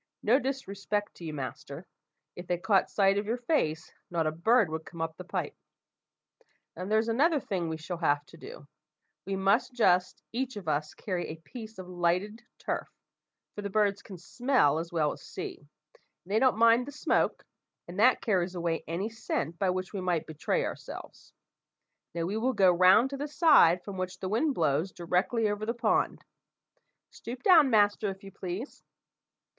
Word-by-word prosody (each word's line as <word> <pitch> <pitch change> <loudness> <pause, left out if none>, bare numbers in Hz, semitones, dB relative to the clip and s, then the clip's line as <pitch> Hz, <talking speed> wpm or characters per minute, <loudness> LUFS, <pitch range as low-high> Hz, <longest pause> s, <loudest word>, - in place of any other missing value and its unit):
No 245 +5 +4
disrespect 210 -6 -3
to - - -12
you, 160 - -4
master; 150 +3 -7 0.5
if 175 0 -9
they 175 - 0
caught 190 +2 +2
sight 195 0 +3
of 205 - -5
your 235 +3 0
face, 160 - -1 0.2
not 170 -2 0
a 155 - +1
bird 215 +7 +3
would 160 0 -4
come 170 - -12
up 165 0 -3
the 180 - -9
pipe. 180 - -4 1.2
"Now 180 - -5
there's 220 +3 +1
another 290 +7 +3
thing 180 -8 -3
we 160 - -3
shall 165 +2 -6
have 145 -3 +1
to 130 - -16
do: - - -11 0.6
we 195 - -1
must 200 +6 +1
just 185 -6 +2
each 260 +2 -3
of 200 -5 -8
us 150 0 -1
carry 180 -4 -3
a 155 - -6
piece 220 +6 -11
of 185 -1 -8
lighted 180 +5 -1 0.2
turf, - - -3 0.7
for 205 - -6
the 200 - -4
birds 205 -1 +1
can 190 - -10
smell 225 - +1
as 165 +1 -6
well 155 -3 +1
as - - -9
see; - - -7 0.3
and 185 - -19
they 215 - +3
don't 255 -2 +3
mind 230 +2 +5
the - - -6
smoke, 290 - 0 0.4
and 175 +3 -7
that 250 +4 +5
carries 185 -4 0
away 170 -2 -2
any 170 +6 -2
scent 170 -8 -4
by 195 - +2
which 185 +2 -3
we 195 - -3
might 175 -3 0
betray 155 -1 -1
ourselves. - - -8 0.8
Now, 170 - -1
we 200 +5 -2
will 255 +4 0
go 195 -4 +5
round 185 +9 +5
to 275 - -4
the 290 +2 -3
side 285 - +5
from 200 -2 -7
which 185 0 -4
the 185 - -4
wind 270 +7 +1
blows 155 +3 +1
directly 180 +7 0
over 205 0 -2
the 230 +2 -2
pond. 230 -2 0 0.9
Stoop 245 +2 -8
down, 325 -7 +7
master, 205 -2 +3
if 195 0 -8
you 195 - -10
please. 190 +9 -6
195 Hz, 185 wpm, -29 LUFS, 170-225 Hz, 1.2 s, down